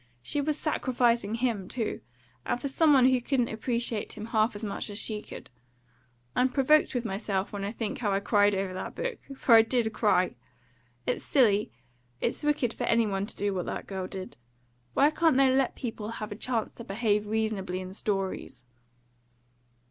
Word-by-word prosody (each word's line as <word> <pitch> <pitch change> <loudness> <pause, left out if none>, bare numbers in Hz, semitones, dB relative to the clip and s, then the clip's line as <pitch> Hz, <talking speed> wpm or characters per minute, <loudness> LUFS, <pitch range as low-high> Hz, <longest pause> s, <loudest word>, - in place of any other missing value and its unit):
She 290 - -1
was 300 +1 0
sacrificing 240 -8 +1
him 230 -6 -1
too; 230 -3 -3 0.4
and 240 - -1
for 280 - -3
some 305 +3 +3
one 265 -3 +6
who 255 -1 +4
couldn't 245 -1 +1
appreciate 230 -1 -2
him 215 -1 -7
half 220 0 +1
as 205 - -7
much 205 +1 -4
as 205 - -6
she 215 -1 -2
could. - - -11 0.8
I'm 255 +1 +3
provoked 280 +2 +3
with 245 -1 -1
myself 195 -1 -2
when 200 -1 -4
I 200 - -2
think 225 -2 -4
how 210 -4 0
I 195 - +2
cried 205 0 +3
over 190 -1 -2
that 185 - -6
book - - -3 0.2
for 260 - +3
I 225 - +10
did 225 -1 0
cry. - - +2 0.7
It's - - -1
silly 215 -7 +3 0.5
it's 235 - -1
wicked 295 -6 +1
for - - -3
any 230 -1 +3
one 200 -1 -2
to - - -9
do 205 0 0
what 180 -2 -3
that - - -4
girl 190 -2 -4
did. 190 0 -7 0.6
Why 290 +2 +5
can't 320 -3 +3
they 270 -1 +5
let 265 -2 +1
people 225 -4 -5
have 215 -2 -5
a - - -4
chance 230 0 -2
to 235 - -10
behave 210 0 0
reasonably 210 -4 -1
in 185 0 -7
stories?" 195 - -3
225 Hz, 185 wpm, -28 LUFS, 205-255 Hz, 0.8 s, I